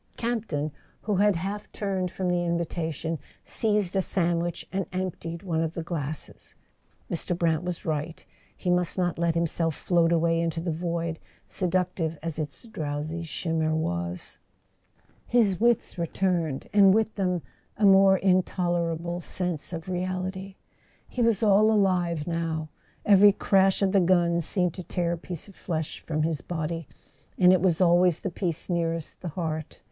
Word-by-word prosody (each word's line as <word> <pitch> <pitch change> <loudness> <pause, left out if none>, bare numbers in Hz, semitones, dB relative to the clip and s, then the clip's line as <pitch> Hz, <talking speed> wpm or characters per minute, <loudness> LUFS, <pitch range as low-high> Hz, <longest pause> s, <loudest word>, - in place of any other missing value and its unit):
Campton, 215 -11 -2 0.3
who 210 -3 0
had 205 0 +4
half 200 +5 -4
turned 190 -3 -2
from 185 +1 -3
the 175 0 +1
invitation, 165 -2 -2 0.2
seized 210 -4 0
a 190 - +3
sandwich 175 -2 -1
and 195 -1 -2
emptied 180 -2 -4
one 165 -4 0
of 165 0 -2
the 165 - -3
glasses. 155 -3 -5 0.5
Mr. 175 +1 -1
Brant 165 -3 +1
was 180 -1 -4
right; 155 +1 -3 0.3
he 180 - -1
must 180 0 +1
not 175 -2 0
let 170 -1 +1
himself 165 -1 0
float 170 -2 +2
away 165 0 +2
into 165 0 -1
the 170 +1 -2
void, 170 0 -2 0.3
seductive 180 -3 -1
as 165 -1 -3
its 150 -2 -5
drowsy 155 -3 -4
shimmer 160 -1 -1
was. 85 - -3 0.9
His 215 -7 +3
wits 235 -5 +1
returned, 170 -4 -1
and 200 -2 +7
with 220 0 +1
them 180 -5 -1 0.3
a 210 - +3
more 195 0 +7
intolerable 175 -2 0
sense 175 -4 -3
of 165 -1 -6
reality. 185 +1 -3 0.5
He 250 - -3
was 230 -2 +2
all 210 +1 +5
alive 180 -6 +2
now. 165 -2 -2 0.4
Every 205 0 +7
crash 195 0 +3
of 190 - +3
the 200 - +4
guns 170 -2 +3
seemed 180 -3 +1
to 185 - -7
tear 175 -1 -1
a 170 - -1
piece 175 0 -7
of 195 - -15
flesh 160 -3 -4
from 155 -1 -2
his 160 -4 -1
body; 165 -1 -4 0.5
and 180 0 +6
it 185 - +3
was 175 -3 +2
always 175 -1 +4
the 195 - -3
piece 170 -3 -3
nearest 165 -2 -2
the 180 - -5
heart. 155 -2 -4
175 Hz, 155 wpm, -27 LUFS, 165-190 Hz, 0.9 s, and